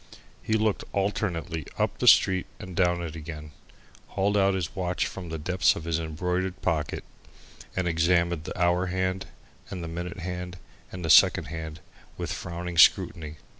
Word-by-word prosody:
He 110 - -2
looked 110 -2 +1
alternately 85 -6 -2
up - - -1
the - - 0
street 95 -2 +6
and 95 -1 -8
down 85 -1 +2
it 80 -2 -6
again, 75 -1 -8 0.6
hauled 100 +1 0
out 100 -1 +3
his 90 -4 -3
watch 90 -1 -1
from 90 -3 -7
the 80 - -4
depths 90 +5 +2
of 80 - -6
his 85 0 -1
embroidered 90 +3 -2
pocket, 75 -5 -1 0.7
and 95 -1 0
examined 85 -1 +1
the - - -6
hour 90 +1 +2
hand 95 +1 -2 0.4
and 90 -3 -5
the - - -4
minute 85 +4 -5
hand 90 0 -5 0.3
and 90 -2 -6
the 80 - +3
second - - +6
hand 80 -1 -6 0.4
with - - -3
frowning 85 -1 -4
scrutiny. 75 -2 +4
90 Hz, 165 wpm, -27 LUFS, 80-95 Hz, 0.7 s, street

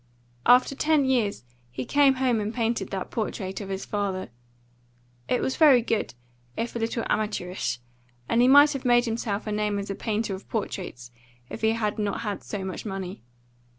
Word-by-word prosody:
After 250 +2 +6
ten 300 0 +2
years 235 - +1 0.3
he 125 +1 -5
came 280 -2 +4
home 255 -3 +1
and 210 0 -2
painted 230 -4 -1
that 190 -1 -4
portrait 200 -3 -3
of 195 - -7
his 195 0 -4
father. 195 - -3 1.0
It 250 - +2
was 260 - -1
very 275 -7 +6
good, 220 - -1 0.4
if 235 - -3
a - - -1
little 230 0 -1
amateurish, 180 - -1 0.5
and 230 - +3
he 250 - +5
might 285 +3 +7
have 275 - -5
made 240 0 +4
himself 225 -3 -2
a 215 - -3
name 210 -1 0
as 200 0 -4
a - - -1
painter 215 -1 -2
of 190 - -9
portraits 175 - -4 0.4
if - - -6
he 220 0 +3
had 215 -2 -2
not 210 +1 -1
had 210 -3 -3
so 200 -3 -5
much 190 - -5
money. 195 -2 -5
215 Hz, 185 wpm, -26 LUFS, 195-240 Hz, 1.0 s, might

